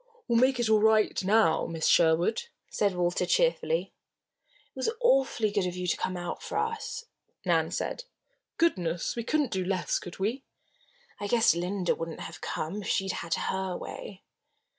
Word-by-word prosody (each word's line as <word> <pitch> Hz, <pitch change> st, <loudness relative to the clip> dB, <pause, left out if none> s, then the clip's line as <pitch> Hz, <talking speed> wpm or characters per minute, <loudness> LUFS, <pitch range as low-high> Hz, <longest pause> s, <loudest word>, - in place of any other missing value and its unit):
"We'll 235 Hz, -2 st, +3 dB
make 260 Hz, 0 st, +3 dB
it 240 Hz, -, +1 dB
all 215 Hz, -1 st, +5 dB
right 215 Hz, -2 st, +3 dB
now, 200 Hz, -4 st, +3 dB
Miss 165 Hz, -1 st, -3 dB
Sherwood," 170 Hz, -, +3 dB, 0.2 s
said 200 Hz, -3 st, +1 dB
Walter, 175 Hz, 0 st, 0 dB
cheerfully. -, -, +1 dB, 0.8 s
"It -, -, -58 dB
was -, -, 0 dB
awfully 265 Hz, -, +3 dB
good 200 Hz, -3 st, 0 dB
of 180 Hz, -, -4 dB
you 180 Hz, 0 st, -4 dB
to 180 Hz, -, +1 dB
come 185 Hz, -1 st, -3 dB
out 175 Hz, 0 st, -5 dB
for -, -, -4 dB
us," 455 Hz, +1 st, -3 dB, 0.4 s
Nan -, -, +2 dB
said. -, -, -3 dB, 0.5 s
"Goodness! 180 Hz, -, 0 dB
we 235 Hz, -, -3 dB
couldn't 295 Hz, +1 st, 0 dB
do 190 Hz, -1 st, -1 dB
less, 185 Hz, -1 st, 0 dB
could 175 Hz, -, -9 dB
we?" 225 Hz, +8 st, -2 dB, 0.8 s
"I 205 Hz, -, -3 dB
guess 230 Hz, +1 st, +4 dB
Linda 180 Hz, +2 st, 0 dB
wouldn't 165 Hz, -1 st, -6 dB
have 160 Hz, 0 st, -8 dB
come 185 Hz, +7 st, -3 dB
if -, -, -7 dB
she 195 Hz, -1 st, 0 dB
had -, -, +2 dB
had 170 Hz, -1 st, -3 dB, 0.2 s
her 190 Hz, -1 st, -2 dB
way." 195 Hz, -2 st, -8 dB
200 Hz, 175 wpm, -28 LUFS, 180-240 Hz, 0.8 s, all